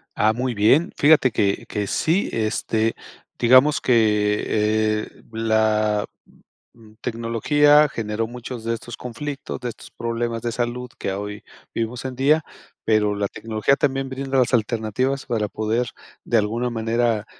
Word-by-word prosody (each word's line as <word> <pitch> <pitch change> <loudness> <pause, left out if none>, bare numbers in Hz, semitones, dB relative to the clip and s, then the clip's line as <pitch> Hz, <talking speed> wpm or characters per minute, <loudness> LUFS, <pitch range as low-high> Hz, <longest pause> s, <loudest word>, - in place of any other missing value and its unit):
Ah, 110 +1 +3
muy 125 +2 -2
bien. 115 - +3
Fíjate 145 -3 +5
que 100 -2 0
que 105 -1 -2
sí, 170 - +1
este, 110 0 0 0.4
digamos 130 +5 +5
que, 105 -3 +2 0.6
eh, - - -13 0.2
la, 110 -2 +1 0.7
mm, 110 -2 -18
tecnología 140 +6 +3
generó 110 -3 -3
muchos 120 -1 -8
de 115 - 0
estos 120 +1 -7
conflictos, 135 +3 -6
de 125 - -3
estos 115 - -11
problemas 115 0 -3
de 120 - -2
salud 120 +1 -3
que - - -2
a 95 - -3
hoy 105 0 -6 0.3
vivimos 115 +2 -3
hoy 130 - -3
en 130 - -9
día, 150 +4 +3 0.4
pero 105 -2 +2
la 100 -1 -1
tecnología 110 +4 0
también 135 -2 0
brinda 135 0 -2
las 125 -1 +2
alternativas 120 +4 0
para 110 -3 0
poder, 110 +4 -1 0.4
de 120 - +2
alguna 115 +3 0
manera, 115 -1 0
115 Hz, 150 wpm, -22 LUFS, 110-130 Hz, 0.7 s, Fíjate